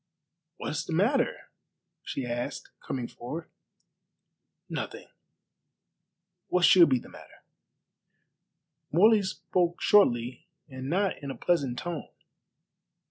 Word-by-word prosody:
"What - - -4
is 155 - -2
the - - -4
matter?" 210 - +1 0.5
she 135 - -4
asked, 120 0 -4
coming 125 -3 -4
forward. 155 +7 -8 1.2
"Nothing. - - -6 1.4
What 180 -1 +3
should 175 -4 +7
be 130 - +3
the - - -10
matter?" - - -15 1.5
Morley 210 +6 +5
spoke 180 -2 -1
shortly 120 - +3 0.2
and 130 -1 -7
not 190 +2 0
in 140 - -6
a 135 - -6
pleasant 140 -5 0
tone. 170 0 -5
160 Hz, 105 wpm, -28 LUFS, 130-180 Hz, 1.5 s, should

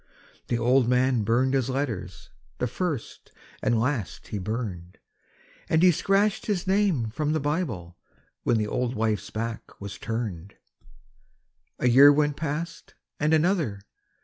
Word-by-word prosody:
The 120 - 0
old 125 +1 +3
man 125 -1 +3
burned 120 +5 +2
his 135 -2 +1
letters, 115 -10 -4 0.3
the - - -1
first 150 -1 -4 0.3
and 115 - +2
last 120 -4 -2
he 105 - -3
burned, 95 -4 -5 0.7
And 160 +2 +3
he 185 - +8
scratched 195 +5 +1
his 200 -4 -1
name 190 - +1
from 150 +5 -1
the 155 - +1
Bible 135 - -3 0.4
when 120 - +2
the 105 - 0
old 125 +3 -2
wife's 110 -2 -1
back 115 +1 -5
was 100 0 -7
turned. 105 -6 -4 1.2
A - - +1
year 135 +4 +8
went 145 0 +2
past 165 +2 -5 0.2
and 150 +1 +1
another. 160 - +2
125 Hz, 140 wpm, -26 LUFS, 110-155 Hz, 1.2 s, he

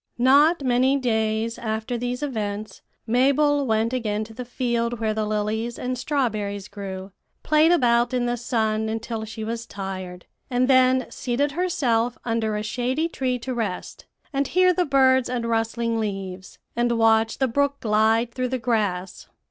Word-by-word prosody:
"Not 285 +6 +5
many 260 +2 +3
days 220 -2 -1
after 220 +2 -3
these 245 +3 -3
events, 215 -6 -4 0.2
Mabel 280 +4 +3
went 225 +2 +1
again 215 -4 -1
to 225 +1 -11
the 250 - -6
field 235 -1 -2
where 220 -1 0
the 215 0 -1
lilies 215 +3 -2
and 255 0 -3
strawberries 215 -7 -2
grew, 195 -1 -7 0.3
played 310 +2 +4
about 240 -6 +3
in 250 -1 0
the 240 0 0
sun 220 -2 -1
until 225 0 -4
she 220 0 -7
was 230 +1 -4
tired, 185 -2 -6 0.2
and 250 0 +1
then 255 -1 +4
seated 270 +4 -1
herself 245 -9 0
under 225 -2 0
a 210 - -3
shady 255 +8 -1
tree 255 -5 -1
to 255 +2 -5
rest, 220 -6 -4 0.3
and 275 0 0
hear 365 0 +4
the 360 +1 +1
birds 260 -2 +4
and 245 -2 -2
rustling 230 0 0
leaves, 195 -3 -5 0.2
and 240 0 +1
watch 225 0 +3
the 265 - +2
brook 280 +3 0
glide 220 +2 +2
through 255 -1 -1
the 260 - -1
grass. 205 -6 -2
235 Hz, 160 wpm, -24 LUFS, 220-255 Hz, 0.3 s, Not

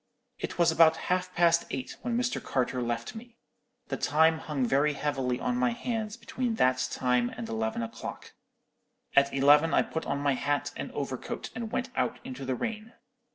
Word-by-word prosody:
"It - - -4
was 170 -1 +4
about 160 0 +6 0.2
half 185 0 -1
past 170 0 +4
eight 130 -1 -4
when 235 -1 -1
Mr. 250 0 -1
Carter 125 -1 -1
left 120 -1 -3
me. 235 +1 -11 0.5
The - - -2
time 160 +2 +3
hung 145 -5 -1
very 140 +4 +2
heavily 135 -4 -1
on 125 - -1
my 125 -1 +2
hands 220 - -3
between 235 0 -2
that 130 - +2
time 125 -2 +1
and 120 -2 -7
eleven 110 +1 -2
o'clock. 115 0 -7 0.8
At 140 0 +5
eleven 145 +4 +5
I - - +5
put 160 - -5
on 140 - 0
my 140 -1 +1
hat 145 +2 -1
and - - -5
overcoat - - -4
and 230 -3 -5
went 255 0 -2
out - - 0
into 130 +1 -6
the 130 0 -1
rain. 225 - -4
145 Hz, 180 wpm, -29 LUFS, 125-185 Hz, 0.8 s, about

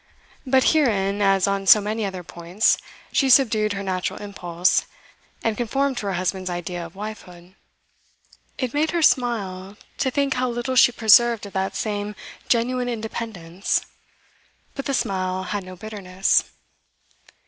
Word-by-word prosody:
But 260 0 +4
herein, 205 -9 +1
as 195 -1 +3
on 200 -1 -1
so 210 - +9
many 215 +1 -2
other 190 -2 -5
points, 175 +5 +1 0.4
she 270 - +2
subdued 220 -5 +4
her 200 0 -4
natural 185 -2 -3
impulse, 180 -3 0 0.6
and 225 -1 0
conformed 270 +4 -1
to 205 - -4
her 195 - -1
husband's 185 +1 -2
idea 175 0 -4
of 170 +1 -11
wifehood. 190 -4 -9 1.0
It 255 -3 -3
made 305 +2 +1
her 335 - +1
smile 205 -7 0 0.2
to 265 - +1
think 280 0 0
how 255 0 -1
little 240 +2 -3
she 245 0 +6
preserved 235 -1 +5
of 200 - -10
that 190 0 -2
same 210 -1 -3 0.3
'genuine 245 +1 +1
independence;' 215 -6 -3 0.9
but 275 - -6
the 275 - 0
smile 185 -4 -1
had 200 +2 -3
no 185 0 -10
bitterness. 195 -2 0
205 Hz, 145 wpm, -23 LUFS, 185-240 Hz, 1.0 s, so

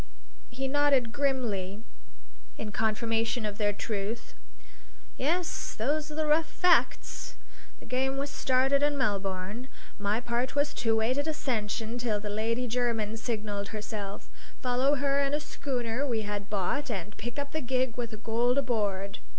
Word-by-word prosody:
He 265 +2 -3
nodded 275 -4 +3
grimly 225 -7 0 0.7
in 215 - -4
confirmation 225 +2 +1
of 205 0 -3
their 205 -1 +3
truth. 205 +2 -3 0.8
"Yes, 335 +5 0
those 295 +7 0
are - - -5
the 315 0 +1
rough 310 +1 +3
facts. 360 0 +2 0.4
The - - -13
game 265 +2 0
was 280 +1 -2
started 265 +2 +3
in 290 0 +3
Melbourne. 200 0 -1 0.3
My 205 +2 +1
part 245 +2 -1
was 290 0 +2
to 225 -2 +3
wait 230 +5 +2
at 285 - -1
Ascension 235 -6 -1
till 225 -4 +1
the 205 0 -4
Lady 230 +4 0
Jermyn 230 -3 0
signalled 210 -3 -2
herself, 210 -2 -5 0.3
follow 255 +3 +3
her 280 0 +2
in 280 +1 +2
a - - 0
schooner 255 -4 -2
we 225 -4 0
had 205 -1 -4
bought 210 +9 0
and 205 -2 -4
pick 240 +4 -5
up 285 0 -3
the 315 - -1
gig 255 -2 +1
with 240 -2 -2
the 215 - -7
gold 235 +4 +2
aboard. 205 -7 0
235 Hz, 155 wpm, -30 LUFS, 215-275 Hz, 0.8 s, nodded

